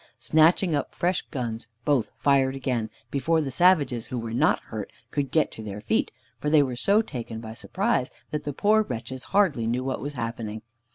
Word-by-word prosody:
Snatching 165 +3 +4
up 145 -2 -2
fresh 180 +1 +1
guns, 115 -5 -4 0.2
both 140 -6 +2
fired 135 -1 +3
again, 125 -4 -1 0.2
before 160 +4 +2
the 145 -4 -2
savages 145 -7 +3
who 125 - -4
were 115 -1 -4
not 120 - +3
hurt 110 -3 -6 0.2
could 140 -2 -1
get 155 -4 +1
on 110 - -6
their 105 0 -5
feet, - - 0 0.3
for 150 - -1
they 150 -1 +6
were 130 -3 -3
so 200 - +3
taken 115 - -6
by 110 -1 -7
surprise, - - 0 0.2
that 150 -1 -2
the 145 - -3
poor 210 +9 +3
wretches 125 - -5
hardly 155 - +2
knew 125 +2 0
what 135 0 -2
was 145 +1 -4
happening. 115 -3 -4
135 Hz, 190 wpm, -26 LUFS, 115-155 Hz, 0.3 s, they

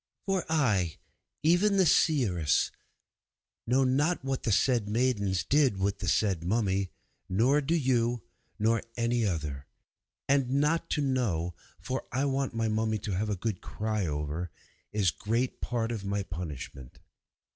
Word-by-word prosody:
For 195 -3 0
I, 105 - +2 0.5
even 180 +6 +4
the 190 - +5
seeress, 105 - +3 1.0
know 130 +3 +3
not 140 +4 +1
what 135 -1 -1
the 115 - -1
said 115 0 +2
maidens 105 -5 +1
did 140 -7 +3
with 100 +1 -1
the - - -4
said 95 -6 +1
mummy, 100 -1 0 0.4
nor 125 +10 +3
do 155 +4 0
you 135 -5 +2
know, 120 0 0 0.3
nor 110 +1 +2
any 115 -1 +1
other. 75 -6 -3 0.6
And 135 -2 +2
not 155 +3 +1
to - - +1
know, 110 - 0 0.3
for 130 +1 -4
I 135 +4 0
want 135 -2 -1
my 115 0 0
mummy 110 0 0
to 105 0 -5
have 100 +3 -1
a 105 - 0
good 100 0 -3
cry 110 -3 -2
over, 75 +3 -3 0.4
is 100 -4 +2
great 115 +9 -2
part 115 -1 -1
of 110 -4 -4
my 100 0 -1
punishment. 75 -8 -7
115 Hz, 150 wpm, -29 LUFS, 95-130 Hz, 1.0 s, the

